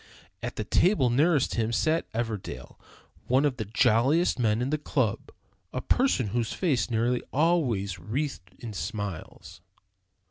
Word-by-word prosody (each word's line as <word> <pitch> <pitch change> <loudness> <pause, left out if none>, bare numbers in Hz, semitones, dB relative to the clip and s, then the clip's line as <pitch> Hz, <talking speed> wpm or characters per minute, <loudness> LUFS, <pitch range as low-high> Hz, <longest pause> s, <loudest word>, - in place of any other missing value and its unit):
At - - -5
the 110 - -3
table 130 - +3
nearest 145 +2 +3
him 115 -1 0
sat 155 +7 0
Everdell, 110 - -5 0.5
one 130 +4 +3
of 135 -4 0
the 110 - -3
jolliest 125 - +2
men 110 -2 +2
in 125 +3 -1
the 155 - 0
club, 130 -8 -1 0.4
a - - -3
person 190 - +1
whose 115 +1 -1
face 155 -9 +1
was - - -12
nearly 120 +2 +1
always 125 - +1
wreathed 105 - -4
in 115 -3 -7
smiles. 100 -4 -6
120 Hz, 145 wpm, -27 LUFS, 110-145 Hz, 0.5 s, table